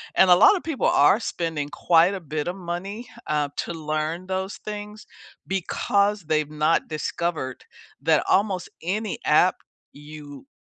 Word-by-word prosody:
And 190 - +5
a 180 - +9
lot 405 - +7
of 370 - -4
people 315 -5 -1
are 145 +9 +5
spending 160 -9 -3
quite 170 +4 +3
a 195 - -4
bit 150 -1 -4
of 175 - -2
money, 195 +5 -6 0.2
uh, 150 -1 0
to - - -3
learn 155 +2 -3
those 190 +1 -3
things 210 0 -8 0.4
because 200 +2 0
they've 155 -1 0
not 155 +2 +1
discovered 155 -3 -3 0.4
that 155 +1 +3
almost 195 -3 +1
any 205 +5 -3
app - - +4 0.3
you 145 - -12
170 Hz, 145 wpm, -24 LUFS, 155-195 Hz, 0.4 s, a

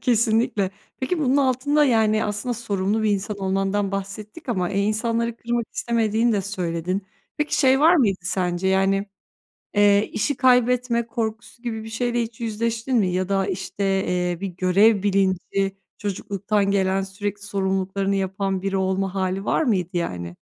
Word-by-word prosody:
Kesinlikle. 225 -5 +2 0.3
Peki 325 +7 -1
bunun 275 -3 +2
altında, 280 +2 +3
yani, 220 -4 +3
aslında 210 +4 -2
sorumlu 210 -2 -1
bir 215 - +2
insan 205 +1 -2
olmandan 195 +1 0
bahsettik 200 +9 -6
ama, 185 -7 0
eee 200 0 +1
insanları 230 +2 0
kırmak 235 0 -2
istemediğini 230 0 +1
de 205 - +1
söyledin. 185 0 -3 0.3
Peki 300 0 0
şey 265 -1 +4
var 330 +4 +6
mıydı 205 - +2
sence? 180 0 -1
Yani, 195 +1 +2 0.7
eee, 205 0 +4
işi 280 +7 0
kaybetme 250 -1 +3
korkusu 225 0 -4
gibi 225 -2 -4
bir 225 - -8
şeyle 240 +1 -1
hiç 225 0 -9
yüzleştin 230 +3 -1
mi? 205 -4 +3
Ya 185 +1 -1
da 195 -1 +1
işte, 190 +1 -4 0.2
eee, 180 -1 0
bir 200 - -1
görev 190 +3 +3
bilinci, 195 0 0 0.2
çocukluktan 200 0 -1
gelen, 190 -1 +1
sürekli 200 +1 -5
sorumluluklarını 195 0 -1
yapan 195 0 -1
biri 195 0 -1
olma 190 0 0
hâli 190 +1 -1
var - - +2
mıydı, 190 - +1
yani? 90 - -4
205 Hz, 150 wpm, -23 LUFS, 190-230 Hz, 0.7 s, var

